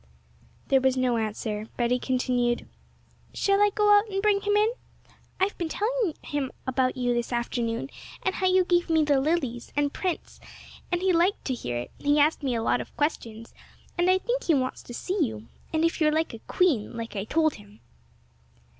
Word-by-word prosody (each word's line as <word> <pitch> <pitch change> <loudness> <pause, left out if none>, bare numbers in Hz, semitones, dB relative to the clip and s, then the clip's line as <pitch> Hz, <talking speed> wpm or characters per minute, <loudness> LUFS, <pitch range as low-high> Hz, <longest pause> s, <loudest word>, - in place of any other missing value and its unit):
There 270 -2 +4
was 260 0 +2
no 250 -2 +2
answer. 215 -1 -3
Betty 245 +1 +1
continued: 250 -2 0 0.7
'Shall 395 0 +2
I 415 - +6
just 410 - -5
go 415 -1 +5
out 410 +2 +3
and 390 -1 -2
bring 405 0 +2
him 410 0 +1
in? 425 +2 +4 0.7
I've 385 +2 +1
been 340 -2 -2
telling 430 -2 -1
him 285 -3 -3
about 260 0 0
you 245 -1 +1
this 240 0 -2
afternoon, 235 +1 -2 0.3
and 375 - +1
how 375 - 0
you 370 0 +4
gave 350 -1 +2
me 320 -1 +4
the 285 -2 +3
lilies, 270 -6 -1
and 290 0 +1
Prince, 365 -3 -4 0.5
and 350 +1 0
he 380 -1 +3
liked 345 +4 +2
to 265 - 0
hear 125 - -4
it; 120 - -5
he 290 +1 +2
asked 300 +3 +3
me 260 -4 -1
a 225 - -1
lot 245 - +1
of - - -12
questions, 230 -7 -3 0.4
and 350 0 +2
I 370 - +5
think - - -2
he 325 - +4
wants 255 -1 -1
to 240 - -11
see 370 +4 -1
you, 220 -4 -4 0.2
and 320 0 +2
if 330 0 -1
you're 305 -1 +4
like 320 -2 0
a 230 - -8
queen, 275 - +1
like 230 -1 -6
I 195 0 -2
told 315 +4 +2
him!' 205 0 -15
290 Hz, 200 wpm, -26 LUFS, 240-365 Hz, 0.7 s, I